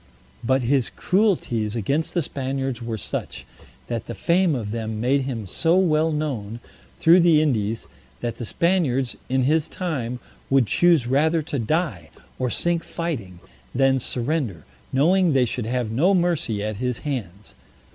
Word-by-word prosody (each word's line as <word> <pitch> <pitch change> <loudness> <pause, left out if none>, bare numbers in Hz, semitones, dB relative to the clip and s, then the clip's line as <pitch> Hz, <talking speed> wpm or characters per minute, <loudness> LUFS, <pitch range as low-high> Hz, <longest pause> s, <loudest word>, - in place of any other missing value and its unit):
But 130 +2 +2
his 125 -4 +2
cruelties 120 - 0
against 150 - -1
the 170 - +2
Spaniards 135 -2 -3
were 115 -1 -3
such, - - -5 0.4
that 115 - -4
the - - -5
fame 170 -2 +2
of 110 -5 -4
them 110 -1 -3
made 130 +4 +2
him 120 -6 -4
so 165 - +1
well 160 -3 +3
known 125 -8 -3 0.4
through 170 +2 +6
the 170 -3 +5
Indies, 115 -7 0 0.3
that 115 -1 -4
the 120 - -5
Spaniards, 135 - +1
in 130 0 +2
his 155 +3 +2
time, 130 -9 -3 0.3
would 135 -2 +4
choose 170 +2 +3
rather 155 +6 +2
to 145 -3 -3
die, 115 - -1 0.3
or 130 -1 0
sink 170 +7 0
fighting, 115 - -5 0.3
than 135 0 +3
surrender, 120 - -2 0.3
knowing 170 +5 +3
they 130 -2 +4
should 120 -1 -3
have 120 -2 -1
no 170 - +3
mercy 165 - 0
at 110 -1 -3
his 125 0 -1
hands. 105 -9 -5
135 Hz, 155 wpm, -23 LUFS, 115-160 Hz, 0.4 s, through